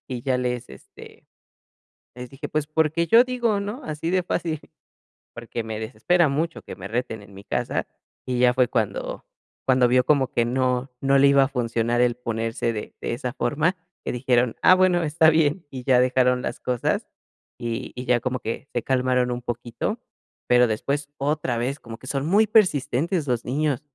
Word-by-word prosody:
y 125 -2 -5
ya 130 -2 +1
les, 125 - -3
este, 65 - -15 0.9
les 125 0 -8
dije: 145 +2 -7
"Pues, 155 -1 -1
porque 160 +2 +1
yo 230 +2 +7
digo, 240 -5 0
¿no? 210 +8 -5
Así 155 +2 -3
de 185 -1 +2
fácil", 165 -3 -2 0.8
porque 115 - -5
me 110 -1 -5
desespera 150 +10 +2
mucho 160 +4 -2
que - - -9
me 95 0 -8
reten 110 -2 -3
en 100 -1 -15
mi 100 - -11
casa, - - -2 0.4
y 125 -1 -1
ya 125 -1 +5
fue 125 -2 +3
cuando 110 -6 -2 0.4
cuando 130 -1 +4
vio 125 0 +3
como 135 -3 +2
que 120 - +2
no 125 +1 0
no 135 0 +3
le 140 +1 +6
iba 140 -1 +5
a - - -2
funcionar 120 -2 0
el 125 -1 +2
ponerse 115 0 -2
de 105 - -6
de - - -3
esa 125 +1 -4
forma, 155 +9 0 0.3
que - - -2
dijeron: 125 -1 +1
"Ah, 185 - +8
bueno, 180 -2 +3
está 160 +1 +4
bien", 160 +2 +1
y 130 -2 -7
ya 130 -2 +4
dejaron 125 0 +2
las - - -4
cosas 125 -2 -1 0.5
y 120 +1 -4
y 125 - -5
ya 125 0 +3
como 130 -1 -2
que 115 +5 -5
se 120 - 0
calmaron 125 -1 +1
un 120 0 -3
poquito, 120 - -4 0.5
pero 125 0 +5
después 140 +6 -2
otra 140 -3 -1
vez, 135 +5 -2
como 115 -1 -9
que 130 - -13
son 140 +1 -2
muy 210 +5 +4
persistentes 165 - +2
los 120 -2 0
niños. 140 0 0
130 Hz, 190 wpm, -24 LUFS, 120-155 Hz, 0.9 s, Ah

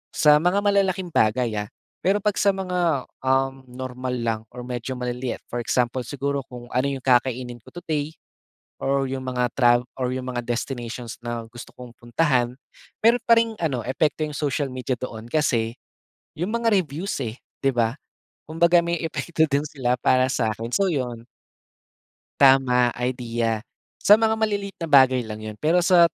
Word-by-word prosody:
sa 150 -1 +6
mga 180 +5 +2
malalaking 190 -3 +1
bagay, 115 +1 +2
ah, 105 - -4 0.4
pero 195 +3 +3
pag 210 -2 +1
sa 200 - +4
mga, 180 -7 0 0.2
um, 135 0 +1
normal 125 0 -5
lang 115 -2 -1
or 125 0 -8
medyo 125 +1 -4
maliliit 125 0 -3
for 120 - -2
example 125 +2 0
siguro, 140 0 -2
kung 120 -1 -10
ano 130 +3 +1
'yong 135 -2 -4
kakainin 125 -1 +1
ko - - -36
today 155 -3 -3 0.7
or 135 0 +1
'yong 130 0 -4
mga 125 -1 0
trav 120 -2 +5 0.2
or 125 -1 -1
'yong 130 0 -4
mga 120 - -2
destinations 120 -1 -4
na 120 -1 -4
gusto 120 +1 -11
kong 125 -1 -10
puntahan. 125 0 +1 0.5
Meron 235 +1 +5
pa 230 - +6
ring 225 -1 -1
ano, 140 -7 0
epekto 150 +3 0
'yong 150 - -7
social 145 -1 -1
media 130 0 -2
doon 115 -3 -7
kasi, 120 -6 +1 0.6
'yong 180 +7 -2
mga 235 0 +1
reviews, 160 +6 -5
eh, 110 +1 -5 0.3
'di 135 - +4
ba, 115 +2 +1 0.5
kumbaga 170 +2 +4
may 170 0 -1
epekto 160 +1 0
din 140 +1 +1
sila 125 -4 0
para 130 0 +3
sa'kin, 115 -1 -1
so 195 -1 +2
'yon. 125 -5 -3 1.2
Tama, 125 -3 +5
idea. 120 -3 -1 0.3
Sa 205 - +6
mga 220 0 +3
maliliit 205 -2 -2
na 165 - -3
bagay 130 -5 +5
lang 110 0 -7
'yon, 110 -1 -7
pero 165 +4 +2
sa, 175 -1 +6
130 Hz, 165 wpm, -24 LUFS, 120-160 Hz, 1.2 s, sa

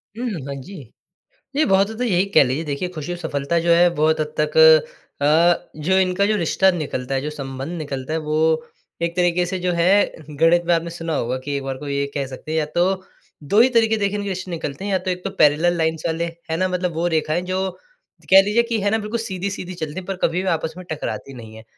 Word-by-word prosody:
हुँ, 240 +3 -4
हुँ। 170 - -5
हाँ 140 - -4
जी, 195 +9 -10 0.8
ये 310 - +4
बहुत 195 +2 +3
हद 220 - -7
तक - - -2
यही 190 -5 +2
कह - - +9
लीजिए 135 +5 -2
देखिए 150 +4 -3
खुशी 155 +2 -5
और 175 - -5
सफलता 160 -1 -1
जो 170 - +5
है 175 +1 +5
बहुत 155 0 +2
हद 150 0 -3
तक 150 0 -1 0.7
अ, 165 +4 +3
जो 180 +5 +1
इनका 190 +1 +2
जो 215 - +1
रिश्ता 190 +1 +3
निकलता 140 -6 -3
है, 135 - +1
जो 150 - -3
संबंध 135 +1 -6
निकलता 140 -2 -5
है 160 - 0
वो 160 +1 +1 0.4
एक 170 +1 -1
तरीके 175 0 +2
से 185 +1 -3
जो 180 0 -1
है 180 +4 +3 0.2
गणित 165 +4 +3
में 175 - +4
आपने 170 0 -2
सुना 165 -1 -4
होगा 125 +1 -1
कि 145 0 -2
एक 140 - -3
बार 135 -1 -4
को 145 - -7
ये 140 0 0
कह 140 -2 -2
सकते 130 +4 -8
हैं 160 - +1
या 155 - +1
तो 175 - +3 0.6
2 200 +10 +3
ही 245 - +7
तरीके 225 -2 +3
देखिए 200 -1 -1
इनके 200 0 -3
रिश्ते 185 -1 -4
निकलते 165 -1 -5
हैं 205 - -2
या 190 - +3
तो 185 +1 -4
1 180 0 -4
तो 195 - -2
पैरेलल 155 +4 +4
लाइन्स 160 0 -1
वाले, 165 0 -1 0.3
है 160 - 0
ना? 185 +2 +1
मतलब 180 -1 -1
वो 165 +2 -1
रेखाएँ 160 +1 0
जो 185 +1 -2 0.6
कह 190 +1 +9
लीजिए 210 +4 +2
कि 235 -1 -2
है 200 +1 +1
ना? 220 - +2
बिल्कुल 215 +2 -3
सीधी-सीधी 190 -3 -4
चलती 155 -3 -5
हैं 185 - -6
पर 195 - -3
कभी 170 +3 +1
भी 190 - -2
आपस 160 -2 -1
में 185 - -9
टकराती 145 -3 -5
नहीं 115 -3 -11
हैं। 110 - -12
170 Hz, 250 wpm, -21 LUFS, 150-190 Hz, 0.8 s, कह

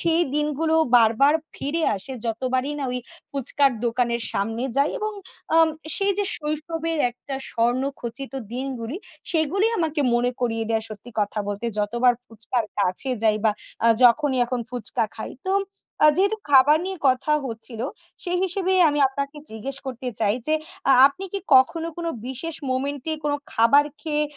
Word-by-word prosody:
সেই 335 0 +3
দিনগুলো 300 +2 +1 0.2
বারবার 235 +6 +5 0.2
ফিরে 310 +4 -2
আসে। 195 +8 -8
যতবারই 255 +4 -1
না 275 - -2
ওই 250 - -1 0.3
ফুচকার 275 +1 +1
দোকানের 235 0 0
সামনে 225 +4 -2
যাই 280 +2 +3
এবং 430 -1 -2 0.4
আ - - +5 0.4
সেই 400 0 +2
যে 405 - +2
শৈশবের 315 +2 -3
একটা 270 +3 -7 0.2
স্বর্ণ 240 +2 +1 0.2
খচিত 270 +4 -5 0.2
দিনগুলি 255 +1 -4 0.4
সেগুলি 335 +6 +2
আমাকে 315 -2 0
মনে 245 +1 +2
করিয়ে 225 -2 0
দেয় 225 -1 +1
সত্যি 215 +3 -10
কথা 205 +1 -1
বলতে 205 +3 -3
যতবার 235 +4 +3
ফুচকার 225 +1 -2
কাছে 200 +6 +1
যাই 215 -1 +3
বা 220 - +5 0.4
আ - - +7 0.2
যখনই 265 +2 +4
এখন 245 0 -2
ফুচকা 240 -2 -2
খাই। 220 - -6 0.2
তো 380 - +1 0.5
আ - - +10
যেহেতু 400 +4 +3
খাবার 285 +3 +7
নিয়ে 380 -1 -4
কথা 260 +4 +1
হচ্ছিল, 225 -1 -7 0.4
সেই 360 0 0
হিসেবেই 375 0 +1
আমি 295 0 0
আপনাকে 280 +2 -4
জিজ্ঞেস 220 +5 -6
করতে 255 -1 -5
চাই। 210 -1 +2
যে 310 - +4 0.4
আ - - +8 0.2
আপনি 370 +7 -8
কি - - +1 0.2
কখনো 325 +6 +3
কোনো 335 -1 -2 0.2
বিশেষ 285 +6 -5 0.2
মোমেন্টে 280 +3 -1
কোন 295 - +1 0.2
খাবার 280 +6 +5 0.2
খেয়ে 300 -1 0
265 Hz, 160 wpm, -23 LUFS, 235-310 Hz, 0.5 s, আ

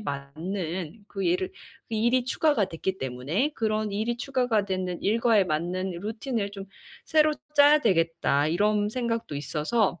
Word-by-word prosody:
맞는 165 +4 -5
그 195 -1 -4
일을 370 +2 +1 0.4
일이 235 +3 +2
추가가 265 -6 +2
됐기 190 +2 -3
때문에 135 - -1
'그런 215 -1 0
일이 220 +4 -1
추가가 250 -6 +1
되는 185 -2 -2
일과에 225 0 +3
맞는 180 +3 -2
루틴을 220 0 -3
좀 195 -1 -7 0.4
새로 310 -1 +4 0.2
짜야 290 +1 +7
되겠다.' 165 - +2
이런 205 +5 +2
생각도 230 - -2
있어서 160 - 0
205 Hz, 290 characters per minute, -27 LUFS, 170-235 Hz, 0.4 s, 짜야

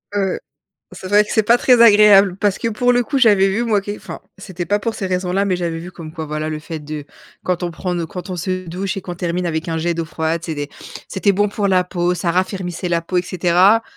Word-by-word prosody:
Heu, 195 -2 0 0.5
c'est 185 0 -8
vrai 205 +2 +5
que - - -13
c'est 220 - +3
pas 235 +3 +4
très 245 -2 +4
agréable 205 -4 +7
parce 205 -2 +1
que - - -2
pour 245 +3 +1
le 245 0 +3
coup, 260 +4 -2
j'avais 205 -6 +5
vu 210 +5 0
moi 220 -3 +2
qui 205 +1 -5
enfin, - - -9 0.2
c'était 185 -2 -6
pas 205 +5 +1
pour 225 +2 -3
ces 195 -3 -4
raisons-là, 185 +2 0
mais 185 - +1
j'avais 170 -2 -3
vu 175 +2 -8
comme 160 -3 -9
quoi, 160 -1 -6
voilà, 155 +1 -3
le 155 0 -4
fait 160 +1 -7
de 150 -1 -7 0.4
quand 180 -1 -1
on 175 - -2
prend 180 +1 -3
nos 170 - -2
quand 180 +3 -8
on 185 - -3
se 185 +1 -3
douche 190 +4 -3
et - - -4
qu'on 175 -1 -7
termine 175 +1 -2
avec 160 +1 -2
un 165 - -1
jet 170 +2 0
d'eau 165 0 -2
froide, 160 0 -2
c'est 165 - -3
des 145 0 -4 0.4
c'était 190 +2 +1
bon 205 +2 +1
pour 205 0 -1
la 185 -1 +3
peau, 175 -1 0
ça 175 0 -2
raffermissait 185 -1 -2
la 170 -1 +1
peau 170 +2 -6
et 180 - +3
cetera. 180 +4 +3
185 Hz, 260 wpm, -19 LUFS, 170-205 Hz, 0.5 s, agréable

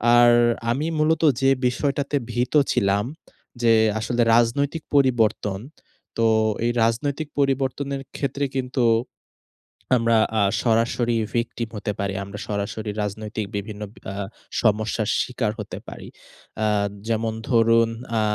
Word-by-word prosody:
আর 120 0 +7 0.4
আমি 140 +6 -1
মূলত 155 +1 +2 0.2
যে 135 - +4 0.2
বিষয়টাতে 140 +3 -1 0.2
ভীত 120 +2 -1 0.2
ছিলাম 100 +1 +2 0.6
যে 115 -1 +5 0.3
আসলে, 120 +2 -1
রাজনৈতিক 140 +7 +1
পরিবর্তন। 115 -7 +2 0.6
তো 115 - +2 0.4
এই 120 - +2
রাজনৈতিক 140 +7 -1
পরিবর্তনের 135 0 0 0.2
ক্ষেত্রে 140 0 -1
কিন্তু 125 -1 0 1.1
আমরা 115 -1 +3 0.2
আ - - +3 0.2
সরাসরি 115 0 +1 0.2
ভিকটিম 115 -1 -2
হতে 105 0 -2
পারি। 100 -1 -1
আমরা 100 +1 -8
সরাসরি 105 +1 -3
রাজনৈতিক 105 +1 -4
বিভিন্ন 105 +1 -5
বি - - -17
আ - - -7 0.5
সমস্যার 110 0 +1
শিকার 125 -4 -1
হতে - - -6
পারি। - - -9 0.6
আ - - +3 0.4
যেমন 110 0 0 0.2
ধরুন 115 -1 +4 0.3
আ - - +2
115 Hz, 120 wpm, -23 LUFS, 110-135 Hz, 1.1 s, আর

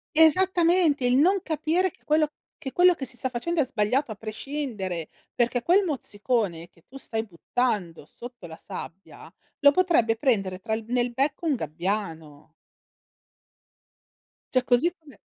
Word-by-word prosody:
Esattamente 335 -3 +4
il 245 +1 +3
non 370 +8 +4
capire 330 +4 0
che - - -26
quello 305 0 +2 0.3
che 270 -5 -7
quello 360 0 +6
che 270 - -5
si 250 0 -13
sta 260 - -2
facendo 305 +7 -1
è 270 - +1
sbagliato 250 +2 0
a - - -5
prescindere, 215 - -4 0.2
perché 240 0 0
quel 380 +4 +4
mozzicone 210 - -2
che 170 - -26
tu 270 - -11
stai 225 -4 -4
buttando 195 - -2
sotto 240 +4 -11
la 160 -1 -9
sabbia, 190 +4 -10 0.3
lo 285 -2 +7
potrebbe 290 -10 +2
prendere 195 -8 0
tra 220 +3 -3
il 220 +1 -2
nel 245 0 0
becco 280 +6 -1
un 295 - +2
gabbiano. 160 - -4 2.0
Cioè 255 -1 +3
così 250 +8 +3
come 305 -4 -17
245 Hz, 150 wpm, -25 LUFS, 205-305 Hz, 2.0 s, lo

